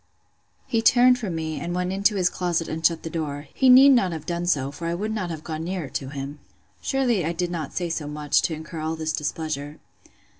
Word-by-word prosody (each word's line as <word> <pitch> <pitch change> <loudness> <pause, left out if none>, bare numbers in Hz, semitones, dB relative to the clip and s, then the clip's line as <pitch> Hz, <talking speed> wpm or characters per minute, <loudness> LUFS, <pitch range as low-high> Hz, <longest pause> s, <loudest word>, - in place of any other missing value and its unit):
He 230 - 0
turned 250 +2 +5
from 200 -8 -3
me, 160 -1 -3
and 175 +1 -4
went 180 +1 -1
into 200 +2 +2
his 185 -3 +2
closet, 175 -3 -1
and 160 +1 -5
shut 165 0 +2
the 165 - -4
door. 145 -3 -4
He 265 - +3
need 260 +2 +9
not 235 -9 +4
have 160 - -6
done 175 0 -2
so; 140 -5 +1
for 165 +4 -6
I 170 - -1
would 210 +5 -3
not 195 -5 -3
have 160 -2 -6
gone 160 -1 -4
nearer 175 -4 -4
to 135 - -4
him! 140 +1 -6 0.4
Surely 250 -8 +1
I 165 +2 -1
did 175 +1 -2
not 160 -5 -5
say 175 - -1
so 160 -3 -3
much, 150 0 +1
to 160 - -1
incur 160 +1 -8
all 160 +1 -2
this 160 -1 -2
displeasure. 150 -1 -3
165 Hz, 230 wpm, -24 LUFS, 155-185 Hz, 0.4 s, need